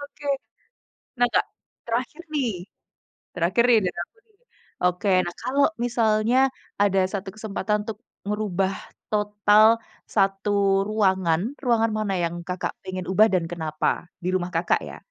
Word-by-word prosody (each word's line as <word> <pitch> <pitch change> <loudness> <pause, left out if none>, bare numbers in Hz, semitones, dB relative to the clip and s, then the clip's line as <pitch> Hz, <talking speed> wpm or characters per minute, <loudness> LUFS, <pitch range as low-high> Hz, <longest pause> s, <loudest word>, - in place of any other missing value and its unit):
Oke. 285 0 -11 0.9
Nah 245 - +5
Kak, - - +4 0.4
terakhir 240 +8 -3
nih 265 -5 +1 0.8
terakhir 180 +6 +2
nih 235 -2 +7
dari 180 - -3
aku - - -13
nih. 435 -2 -33 0.5
Oke, 180 +3 +1 0.2
nah 175 0 -5
kalau 275 +2 +2 0.2
misalnya 225 0 +2 0.5
ada 195 -1 +3
1 195 -1 -4
kesempatan 210 -1 -2
untuk 220 -2 -5 0.3
merubah 195 -2 0 0.4
total 210 0 +4 0.4
1 195 0 +1 0.4
ruangan, 190 -6 +2 0.2
ruangan 230 -2 +3
mana 205 -2 -1
yang 170 0 -2
Kakak 180 0 -2
pengen 185 -1 -5
ubah 215 +4 +5
dan 180 -3 +2
kenapa? 155 -2 -1 0.2
Di 180 - -2
rumah 180 -1 -1
Kakak - - +2
ya. - - -8
205 Hz, 135 wpm, -24 LUFS, 185-225 Hz, 0.9 s, nih